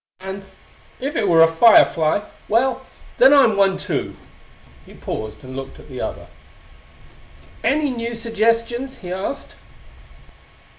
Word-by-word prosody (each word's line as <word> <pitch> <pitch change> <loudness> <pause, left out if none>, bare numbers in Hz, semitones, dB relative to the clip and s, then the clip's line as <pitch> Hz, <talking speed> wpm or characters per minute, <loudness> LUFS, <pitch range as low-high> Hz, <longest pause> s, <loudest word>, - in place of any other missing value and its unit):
And 190 +1 -7 0.5
if 280 +3 -4
it 210 - 0
was 165 -2 +6
a 165 - -7
fire 225 +7 +7
fly 160 +5 -1 0.3
well, 260 +3 0 0.3
then 265 +3 +7
I'm 230 -7 +5
one 195 -1 +2
too." - - -4 0.7
He - - -16
paused, 110 0 -7
and 130 0 -10
looked 135 0 -8
at - - -15
the - - -7
other. - - -5 1.4
"Any 290 0 +1
new 235 -1 -4
suggestions?" 230 +3 -1
he 180 - -6
asked. 195 +9 -5
225 Hz, 135 wpm, -20 LUFS, 185-250 Hz, 1.4 s, fire